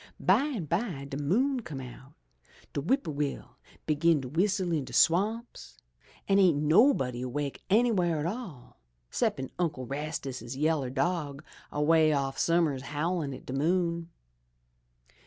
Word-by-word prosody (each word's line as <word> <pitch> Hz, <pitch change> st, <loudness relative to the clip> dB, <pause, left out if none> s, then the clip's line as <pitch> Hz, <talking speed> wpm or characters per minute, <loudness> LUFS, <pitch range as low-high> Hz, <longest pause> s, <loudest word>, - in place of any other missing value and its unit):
Bimeby 190 Hz, -, 0 dB
de 135 Hz, -, -3 dB
moon 240 Hz, -, +1 dB
come 155 Hz, -, -7 dB
out, 130 Hz, +2 st, -11 dB, 0.6 s
de 145 Hz, -, -1 dB
whip 265 Hz, -, +1 dB
poor 155 Hz, -, -4 dB
will 145 Hz, -1 st, -4 dB, 0.3 s
begin 155 Hz, +1 st, +3 dB
to 125 Hz, -, -6 dB
w'istle 185 Hz, +1 st, +1 dB
in 150 Hz, -, -1 dB
de 130 Hz, -1 st, -10 dB
swamps, 175 Hz, -, +1 dB, 0.5 s
an' 195 Hz, 0 st, +4 dB
ain't 180 Hz, -6 st, +5 dB
nobody 150 Hz, -, +3 dB
awake 140 Hz, +2 st, -3 dB
anyw'ere 195 Hz, -7 st, +3 dB
at 150 Hz, -, -2 dB
all, 175 Hz, -, -6 dB, 0.3 s
'ceppin' 130 Hz, -1 st, -1 dB
Uncle 155 Hz, -7 st, -1 dB
Rastus' 135 Hz, -3 st, -5 dB
yaller 150 Hz, -2 st, +1 dB
dog 145 Hz, 0 st, -2 dB, 0.3 s
a 150 Hz, -, -1 dB
way 160 Hz, 0 st, +5 dB
off 135 Hz, -1 st, -1 dB
summ'ers 165 Hz, -6 st, +2 dB
howlin' 150 Hz, +2 st, -2 dB
at 130 Hz, -, -9 dB
de 130 Hz, -, -6 dB
moon. 170 Hz, +3 st, 0 dB
155 Hz, 140 wpm, -29 LUFS, 140-180 Hz, 0.6 s, ain't